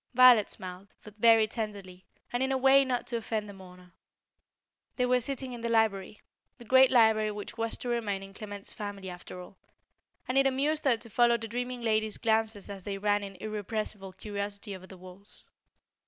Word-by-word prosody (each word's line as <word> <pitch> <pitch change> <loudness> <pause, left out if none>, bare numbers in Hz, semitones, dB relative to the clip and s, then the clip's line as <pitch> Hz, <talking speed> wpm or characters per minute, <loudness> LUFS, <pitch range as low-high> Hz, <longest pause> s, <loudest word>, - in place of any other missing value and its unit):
Violet 250 -4 +7
smiled, 185 +1 -5 0.2
but 210 - -12
very 225 0 +6
tenderly, 200 -4 -6 0.3
and 245 - 0
in 265 0 +1
a 265 - +2
way 270 +1 +6
not 255 -2 -2
to 235 - -2
offend 220 -2 -3
the 205 - -9
mourner. 180 -2 -15 1.0
They 250 - +1
were 250 0 +2
sitting 260 0 -4
in 240 - -7
the 235 - -2
library 215 -3 +1 0.4
the 240 - -13
great 260 +2 +6
library 220 -3 +4
which 210 -1 -6
was 230 0 -2
to 245 - -5
remain 210 -5 -1
in 195 0 -11
Clement's 205 -1 -8
family 200 -3 -6
after 180 0 -10
all 180 +1 -12 0.7
and 255 +2 +2
it 275 - +4
amused 290 +4 0
her 250 -4 +4
to 230 - -8
follow 235 +1 +4
the 225 0 -6
dreaming 245 +1 -4
lady's 220 -1 +1
glances 220 -2 0
as 195 -2 -8
they 200 0 -4
ran 205 +1 +1
in 195 -1 -8
irrepressible 210 0 -5
curiosity 200 -1 -4
over 185 0 -12
the 190 - -12
walls. 185 +3 -9
215 Hz, 190 wpm, -29 LUFS, 200-240 Hz, 1.0 s, Violet